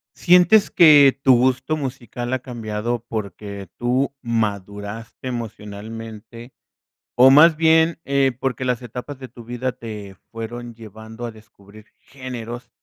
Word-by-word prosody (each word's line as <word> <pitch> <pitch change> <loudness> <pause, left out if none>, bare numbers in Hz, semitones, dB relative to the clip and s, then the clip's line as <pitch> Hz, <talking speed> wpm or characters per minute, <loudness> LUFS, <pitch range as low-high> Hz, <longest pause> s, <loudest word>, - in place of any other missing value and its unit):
¿Sientes 180 +4 +5
que 145 -5 +7
tu 130 - +6
gusto 130 +5 +1
musical 125 -2 -5
ha 130 - -2
cambiado 115 -1 -4
porque 100 -2 -6
tú 130 +3 0
maduraste 105 0 -4
emocionalmente 115 +1 -8 0.7
o 130 +2 +8
más 155 +3 +7
bien, 160 +1 +3
eh, 135 -1 +1
porque 130 0 -3
las 125 -1 -1
etapas 125 +4 -8
de 130 -1 -10
tu 120 0 -13
vida 125 +2 -3
te 105 -5 -9 0.2
fueron 120 +1 -7
llevando 110 +1 -10
a 120 - -5
descubrir 105 -1 -17
géneros 125 -3 -8
120 Hz, 125 wpm, -21 LUFS, 110-130 Hz, 0.7 s, o